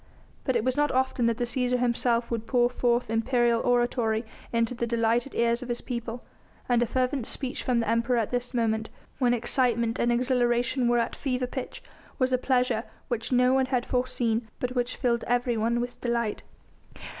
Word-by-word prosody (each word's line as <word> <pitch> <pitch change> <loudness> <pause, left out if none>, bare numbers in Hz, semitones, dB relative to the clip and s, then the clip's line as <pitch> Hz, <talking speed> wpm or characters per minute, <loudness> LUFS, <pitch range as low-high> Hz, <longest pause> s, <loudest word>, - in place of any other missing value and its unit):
But 260 - +1
it 230 - +1
was 255 +1 0
not 295 -1 +2
often 260 -2 +1
that 230 -1 +1
the 245 - -1
Cæsar 250 +1 0
himself 235 -1 +1
would 230 -1 -3
pour 245 -1 +3
forth 240 -2 +1
imperial 235 0 +2
oratory 240 -2 +1 0.3
into 230 +1 +1
the 235 -1 -2
delighted 235 +2 0
ears 235 0 +2
of 250 - -7
his 240 - -2
people, 235 -1 -5 0.4
and 240 -1 +3
a 240 - +2
fervent 255 0 -1
speech 260 -2 -3
from 250 -3 +1
the 230 - -1
Emperor 230 +2 +1
at 225 -3 0
this 245 0 -2
moment, 220 -3 0 0.3
when 245 -2 +3
excitement 235 -1 +1
and 240 - +2
exhilaration 245 0 +1
were 240 0 +3
at 235 0 0
fever 255 -2 -1
pitch, 250 +1 -6 0.3
was 255 -1 +1
a 255 - +3
pleasure 250 -3 +1 0.2
which 230 0 -2
no 250 0 +4
one 265 0 +2
had 250 -2 0
foreseen 240 -2 0
but 250 0 -2
which 245 -1 -1
filled 235 -2 0
everyone 240 -1 +1
with 245 0 -5
delight. 235 -3 -1
240 Hz, 185 wpm, -27 LUFS, 235-250 Hz, 0.4 s, no